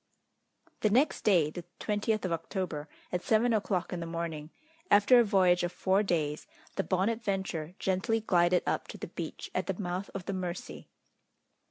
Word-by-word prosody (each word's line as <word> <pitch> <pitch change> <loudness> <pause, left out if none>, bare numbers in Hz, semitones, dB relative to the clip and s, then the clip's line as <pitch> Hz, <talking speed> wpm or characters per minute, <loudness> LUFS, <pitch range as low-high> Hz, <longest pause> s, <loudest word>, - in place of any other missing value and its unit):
The 215 - +2
next 255 +8 +3
day, 170 -7 +4
the 175 - -7 0.2
20th 215 0 0
of 185 - -2
October, 165 -2 -3 0.2
at 180 - -1
seven 230 +3 +3
o'clock 195 -5 0
in 180 - -3
the 170 - -4
morning, 165 -2 -4 0.4
after 210 +5 +7
a - - +6
voyage 185 -4 +4
of 175 - -1
four 190 +2 +2
days, 155 -6 -1 0.3
the - - 0
Bonadventure 190 -4 -1
gently 190 +4 0
glided 180 -4 +3
up - - -1
to - - -8
the - - -7
beach - - -6
at - - -1
the - - -2
mouth 185 0 -3
of 190 -2 -5
the 195 - -2
Mercy. 180 -1 -5
185 Hz, 170 wpm, -30 LUFS, 170-210 Hz, 0.4 s, after